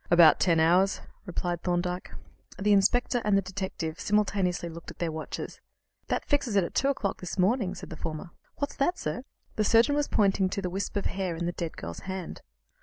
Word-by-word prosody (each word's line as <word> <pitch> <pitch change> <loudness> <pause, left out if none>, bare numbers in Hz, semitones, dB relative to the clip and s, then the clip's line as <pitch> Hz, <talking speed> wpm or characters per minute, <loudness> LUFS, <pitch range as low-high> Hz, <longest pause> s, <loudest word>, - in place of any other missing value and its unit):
"About 170 -2 +7
ten 170 -3 +3
hours," 180 +5 +4 0.3
replied 175 -1 -2
Thorndyke. 180 0 -1 0.5
The 205 +1 +3
inspector 240 +5 +3
and 205 -1 +3
the - - +3
detective 185 -4 -4
simultaneously 200 -4 +1
looked 170 0 -9
at - - -10
their 170 -2 -1
watches. 155 0 -6 0.5
"That - - -1
fixes 275 -7 +1
it 195 - +5
at - - -5
two 275 - +2
o'clock 260 -8 -1
this 180 +1 -5
morning," 195 0 +2
said 175 - -9
the - - -5
former. 160 +3 -5 0.2
"What's 285 - -3
that, 350 +6 +1
sir?" 155 +8 -3 0.4
The 215 - +3
surgeon 230 +6 +5
was 290 0 +1
pointing 195 -3 +2
to 195 - -2
the 180 - -2
wisp 195 +3 -3
of 200 - -1
hair 190 -3 -1
in 170 +1 -3
the 175 - 0
dead 170 -2 -5
girl's 85 +1 -6
hand. 190 -1 -6
190 Hz, 200 wpm, -28 LUFS, 175-205 Hz, 0.5 s, About